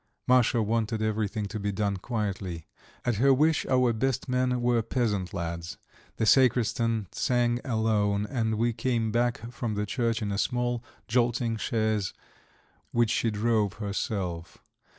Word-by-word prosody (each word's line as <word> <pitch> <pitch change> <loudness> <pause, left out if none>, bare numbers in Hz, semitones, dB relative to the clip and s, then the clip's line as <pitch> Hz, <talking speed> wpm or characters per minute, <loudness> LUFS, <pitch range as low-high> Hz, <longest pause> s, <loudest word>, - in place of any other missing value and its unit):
Masha 125 -2 +4
wanted 110 +1 0
everything 110 -1 -1
to 110 +2 -5
be 100 0 -1
done 100 -1 -1
quietly; 95 -6 -3 0.4
at 120 -4 +1
her 135 +5 +5
wish 155 +3 +3
our 125 -2 +3
"best 130 +3 -1
men" 125 -1 +1
were 120 -1 +2
peasant 105 -5 -1
lads, 85 -3 -4 0.4
the 110 - 0
sacristan 115 -3 +3
sang 120 -1 +1
alone, 105 -4 +1
and 110 -2 -1
we 115 +2 +1
came 115 -1 0
back 120 0 0
from 120 -3 -3
the 105 0 -1
church 115 +1 0
in 100 - -2
a 100 - -1
small, 120 0 0 0.2
jolting 120 0 +1
chaise 110 -4 -1 0.8
which 120 -2 +2
she 115 - +1
drove 105 -2 +1
herself. 100 -4 -3
115 Hz, 145 wpm, -28 LUFS, 105-120 Hz, 0.8 s, her